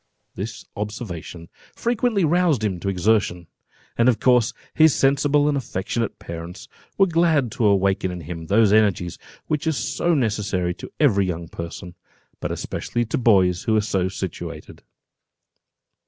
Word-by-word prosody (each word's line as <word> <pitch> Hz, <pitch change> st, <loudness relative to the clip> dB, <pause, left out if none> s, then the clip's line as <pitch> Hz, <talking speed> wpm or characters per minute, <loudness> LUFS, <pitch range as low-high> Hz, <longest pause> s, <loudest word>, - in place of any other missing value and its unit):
This 100 Hz, 0 st, -6 dB
observation 100 Hz, -6 st, -6 dB, 0.3 s
frequently 235 Hz, -5 st, +1 dB
roused 165 Hz, -7 st, +2 dB
him 95 Hz, -5 st, -1 dB
to 100 Hz, -, -2 dB
exertion; 95 Hz, -2 st, +1 dB, 0.5 s
and 120 Hz, +2 st, +4 dB
of 120 Hz, -, +1 dB
course 125 Hz, -3 st, +3 dB, 0.2 s
his 155 Hz, -2 st, +5 dB
sensible 145 Hz, +2 st, +3 dB
and 150 Hz, -, +1 dB
affectionate 115 Hz, -3 st, -3 dB
parents 85 Hz, +3 st, -8 dB, 0.3 s
were 195 Hz, -, +6 dB
glad 165 Hz, -, +2 dB
to 110 Hz, -1 st, +1 dB
awaken 95 Hz, -1 st, +2 dB
in 90 Hz, -1 st, -6 dB
him 80 Hz, +1 st, -7 dB
those 105 Hz, +1 st, +4 dB
energies 100 Hz, -5 st, +2 dB, 0.3 s
which 155 Hz, +1 st, -2 dB
are -, -, +3 dB
so 170 Hz, +3 st, 0 dB
necessary 100 Hz, -, 0 dB
to -, -, -10 dB
every 100 Hz, -10 st, +3 dB
young 85 Hz, -2 st, -4 dB
person, 85 Hz, +1 st, -7 dB, 0.5 s
but -, -, -3 dB
especially 120 Hz, 0 st, -3 dB
to 115 Hz, -, -2 dB
boys 95 Hz, -7 st, +3 dB
who 110 Hz, -, +2 dB
are -, -, +4 dB
so 95 Hz, -3 st, 0 dB
situated. 85 Hz, -4 st, -7 dB
105 Hz, 145 wpm, -22 LUFS, 90-135 Hz, 0.5 s, were